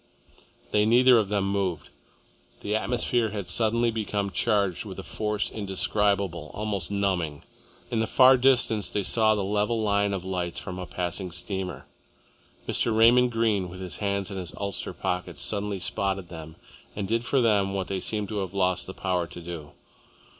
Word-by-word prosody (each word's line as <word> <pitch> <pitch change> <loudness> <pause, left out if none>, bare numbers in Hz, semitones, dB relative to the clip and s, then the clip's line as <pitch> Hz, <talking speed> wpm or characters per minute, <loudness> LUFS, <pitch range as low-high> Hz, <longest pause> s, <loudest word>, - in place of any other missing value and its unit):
They 105 - +3
neither 120 +2 +6
of 105 -3 -1
them 100 -2 0
moved. 95 -5 -2 0.7
The 105 - -1
atmosphere 120 0 +1
had 100 -3 -5
suddenly 115 +5 +1
become 105 -3 -2
charged 100 -4 +1
with - - -8
a - - -6
force 105 -1 -2
indescribable, 100 -4 0
almost 100 -4 -3
numbing. 95 -7 -1 0.5
In 115 - 0
the 110 - +1
far 130 +3 +7
distance 125 -5 +3
they 100 - -1
saw 110 +1 +3
the 100 - -1
level 105 +3 0
line 100 -1 +1
of 95 -2 -3
lights 90 -2 -2
from 90 -2 -6
a 90 - -6
passing 90 +2 -3
steamer. 90 +1 -5 0.8
Mr. 110 -2 +2
Raymond 120 +2 +6
Greene, 110 -5 +1
with 90 +1 -9
his 90 -2 -5
hands 100 -1 -2
in 95 - -5
his 90 -2 -6
ulster 100 -1 -3
pockets, 90 -4 -3
suddenly 100 -2 -2
spotted 95 -1 -2
them 80 -2 -9 0.4
and 100 -2 -3
did 115 +3 0
for 135 +2 +1
them 100 -5 +2
what 95 -1 -1
they 95 0 -3
seemed 105 +1 -2
to 105 -2 -2
have 95 0 -4
lost 95 -2 +1
the 95 - -8
power 90 -2 -1
to 90 - -10
do. 80 -4 -8
100 Hz, 175 wpm, -26 LUFS, 90-110 Hz, 0.8 s, far